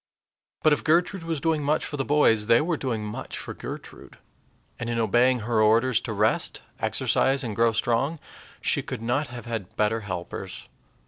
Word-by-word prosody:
But 155 - +6
if - - -1
Gertrude 175 +4 +2
was 165 -2 -3
doing 160 +1 +1
much 150 +2 +1
for - - -5
the 135 - -1
boys, 115 -7 +3
they 115 0 +6
were 165 +2 0
doing 120 -7 -3
much 105 - -6
for - - -6
Gertrude; - - -9 0.6
and 120 - -3
in 120 - -1
obeying 120 +3 +3
her 110 0 +1
orders 115 +3 +4
to 115 - -5
rest, 105 +1 0 0.2
exercise, 135 +1 +1
and 110 -4 -4
grow 115 +1 +3
strong, 120 +8 0 0.4
she - - +1
could 110 - -6
not 130 +6 0
have 120 0 -9
had 115 -6 -5
better 110 +1 +2
helpers. 95 -1 -6
120 Hz, 180 wpm, -26 LUFS, 110-145 Hz, 0.6 s, But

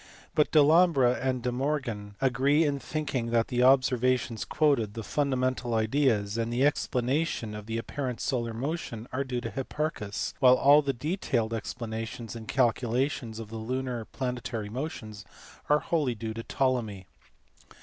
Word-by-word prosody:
But 155 -3 +3
Delambre 155 -4 +5
and 130 -2 -1
De 125 - 0
Morgan 120 -6 -2
agree 135 +4 +3
in 145 -2 0
thinking 140 -6 -3
that 115 -1 +1
the 125 0 0
observations 130 -3 +3
quoted, 135 -9 +1
the 115 - -5
fundamental 130 -2 0
ideas, 110 -2 +1
and 115 0 -1
the 125 +3 +2
explanation 130 -3 0
of 105 0 -8
the 115 0 -2
apparent 125 +1 -4
solar 120 -3 -1
motion 125 -2 -4
are 135 +2 0
due 125 -2 -3
to - - -5
Hipparchus; 135 -6 -3
while 130 -2 +7
all 145 +3 +6
the 140 -2 0
detailed 125 - -1
explanations 115 +1 -5
and 110 -1 -8
calculations 120 -1 0
of 110 -2 -7
the 115 - -6
lunar 125 +2 -3
and 110 - -10
planetary 120 -4 -4
motions 110 -5 -6 0.5
are 150 - +6
wholly 145 -8 0
due 110 0 -5
to 115 - -5
Ptolemy. 115 -7 -1
125 Hz, 150 wpm, -28 LUFS, 115-140 Hz, 0.5 s, while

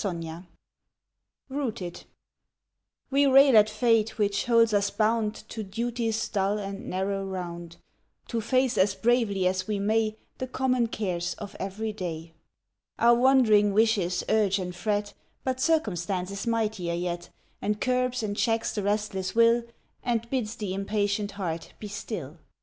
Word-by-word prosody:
ROOTED 175 -5 -2
45 165 +3 -8 1.0
ROOTED 235 -11 -4 1.1
WE 280 +1 +4
rail 270 -1 +7
at 215 0 +7
fate 225 0 +2
which 205 -1 +1
holds 230 -2 +4
us 200 -1 +2
bound 220 0 0
To 220 - -5
duty's 225 +2 -2
dull 200 0 0
and 195 -1 -6
narrow 195 +1 -1
round, 175 -3 -6 0.5
To 230 -2 -1
face 255 +2 +1
as 195 +1 +3
bravely 225 -5 +1
as 185 0 0
we 210 -1 -1
may 215 +2 +1 0.2
The 255 - -3
common 255 -2 +1
cares 180 -6 -2
of 205 -1 -9
every 210 +3 -3
day. 165 -4 -6 0.6
Our 235 +1 +6
wandering 235 -5 +5
wishes 200 -5 +2
urge 210 -3 +3
and 180 -2 -4
fret, 205 +3 -1 0.3
But 260 -1 -1
circumstance 195 - 0
is 200 +3 -5
mightier 215 -7 0
yet, 175 0 -3 0.3
And 210 +1 -1
curbs 255 -1 0
and 205 -1 -2
checks 225 +1 0
the 210 - -2
restless 205 -1 -1
will, 230 +1 +4 0.4
And 235 -1 -1
bids 235 -4 -1
the 205 -5 -4
impatient 205 +1 -1
heart 170 -5 -5
be 210 - -7
still. 175 - -6
210 Hz, 145 wpm, -27 LUFS, 190-230 Hz, 1.1 s, rail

